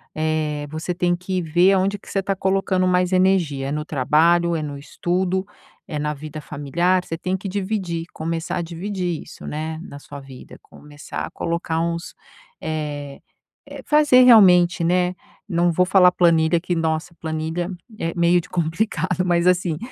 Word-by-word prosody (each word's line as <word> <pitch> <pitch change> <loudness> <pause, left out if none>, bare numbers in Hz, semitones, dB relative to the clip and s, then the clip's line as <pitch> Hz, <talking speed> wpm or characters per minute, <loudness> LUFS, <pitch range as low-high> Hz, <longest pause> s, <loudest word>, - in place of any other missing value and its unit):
eh, 155 -1 -1
você 160 +3 -4
tem 175 0 +1
que 180 +1 -3
ver 175 +4 +3
aonde 195 +2 +1
que - - -16
você 195 - 0
tá 195 -1 -1
colocando 190 -1 +1
mais 180 0 +2
energia. 180 -8 +2
É - - -3
no 150 0 -3
trabalho? 165 +5 +2
É 160 - -2
no 145 -1 -5
estudo? 180 +5 -2 0.4
É 150 - -4
na 150 0 -2
vida 155 +1 -8
familiar? 170 +6 0
Você 165 - -5
tem 185 +2 -2
que 190 - -7
dividir 190 -4 -3
começar 165 +1 -3
a - - -1
dividir 175 0 -4
isso, - - -12
né, 155 +1 -4
na 140 - -10
sua 145 0 -10
vida. 135 -2 -13
Começar 145 0 -8
a - - -10
colocar 170 -1 -2
uns, 170 +1 -3 0.5
eh 145 -3 -4 0.5
eh, - - -9
fazer 295 -4 +5
realmente, 180 -8 +6
né, 180 +1 +2 0.3
não 175 0 +2
vou 180 +2 +2
falar 185 -1 +5
planilha, 170 -1 +3
que 175 +1 -2
nossa 165 +1 -2
planilha 160 +2 -3 0.3
é 165 0 -2
meio 175 0 +3
de - - -16
complicado, 180 +2 -1
mas, 175 -1 +2
assim, 180 -3 +2
170 Hz, 170 wpm, -21 LUFS, 155-185 Hz, 0.5 s, realmente